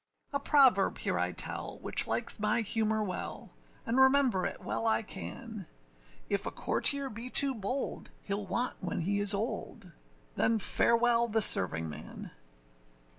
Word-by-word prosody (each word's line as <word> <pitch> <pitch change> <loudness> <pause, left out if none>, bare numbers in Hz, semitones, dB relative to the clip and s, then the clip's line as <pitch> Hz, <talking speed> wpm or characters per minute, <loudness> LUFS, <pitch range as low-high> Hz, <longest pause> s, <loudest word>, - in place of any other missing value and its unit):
A 280 - 0
proverb 270 -8 +3
here - - -2
I - - -1
tell, - - -4
which - - +3
likes - - +1
my 240 - 0
humour 220 0 -1
well, 185 -3 -7 0.3
And 240 +3 0
remember 265 -7 +3
it - - -9
well 225 - -3
I 225 - +1
can, 215 -2 -9 0.6
If - - -2
a - - -1
courtier 280 -1 +2
be 230 +1 -8
too 275 +1 +7
bold, 245 +4 -5 0.2
heâll 200 0 -3
want 245 +7 -2
when 180 -2 -4
he 200 +4 -1
is 205 0 +3
old. 205 -2 -6 0.4
Then 225 - +1
farewell 235 +3 +2
the 225 0 0
servingman. 80 - 0
225 Hz, 145 wpm, -30 LUFS, 200-250 Hz, 0.6 s, too